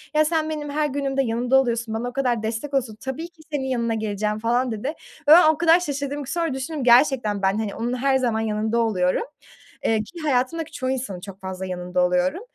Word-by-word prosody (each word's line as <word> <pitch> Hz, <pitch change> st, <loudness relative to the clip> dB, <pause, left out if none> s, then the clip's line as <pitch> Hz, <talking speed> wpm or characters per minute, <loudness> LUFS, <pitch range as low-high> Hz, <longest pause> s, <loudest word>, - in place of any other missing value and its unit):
"Ya, 310 Hz, 0 st, +5 dB
sen 315 Hz, 0 st, 0 dB
benim 300 Hz, -2 st, -4 dB
her 300 Hz, +1 st, 0 dB
günümde 275 Hz, -1 st, -1 dB
yanımda 240 Hz, +2 st, 0 dB
oluyorsun, 230 Hz, -3 st, -2 dB
bana 235 Hz, +2 st, -2 dB
o -, -, -12 dB
kadar 245 Hz, -4 st, 0 dB
destek 225 Hz, +6 st, -3 dB
oluyorsun, 250 Hz, -5 st, 0 dB
tabii 275 Hz, +6 st, -4 dB
ki 340 Hz, -2 st, -21 dB
senin 285 Hz, -3 st, -1 dB
yanına 235 Hz, -3 st, 0 dB
geleceğim." 210 Hz, 0 st, -2 dB
falan 240 Hz, +3 st, +1 dB
dedi. 220 Hz, +3 st, -4 dB
Ve 300 Hz, -, -1 dB, 0.3 s
ben 315 Hz, +1 st, +8 dB
o 315 Hz, -, +2 dB
kadar 335 Hz, +1 st, +5 dB
şaşırdım 285 Hz, -3 st, -3 dB
ki, 270 Hz, -, -7 dB
sonra 335 Hz, -4 st, -1 dB
düşündüm, 265 Hz, +2 st, -4 dB
gerçekten 245 Hz, -4 st, +4 dB
ben, 195 Hz, +1 st, +2 dB
hani, 215 Hz, -3 st, -3 dB
onun 235 Hz, +2 st, -2 dB
her 270 Hz, +1 st, +2 dB
zaman 240 Hz, -4 st, 0 dB
yanında 220 Hz, +1 st, 0 dB
oluyorum, 185 Hz, -6 st, +1 dB, 0.6 s
eee, 225 Hz, -, +3 dB
ki 340 Hz, +11 st, -11 dB
hayatımdaki 295 Hz, +3 st, 0 dB
çoğu 260 Hz, -4 st, -3 dB
insanın 245 Hz, -8 st, -3 dB
çok 195 Hz, +1 st, -10 dB
fazla 190 Hz, 0 st, -5 dB
yanında 180 Hz, 0 st, -1 dB
oluyorum. 180 Hz, -, +1 dB
250 Hz, 210 wpm, -23 LUFS, 220-285 Hz, 0.6 s, ben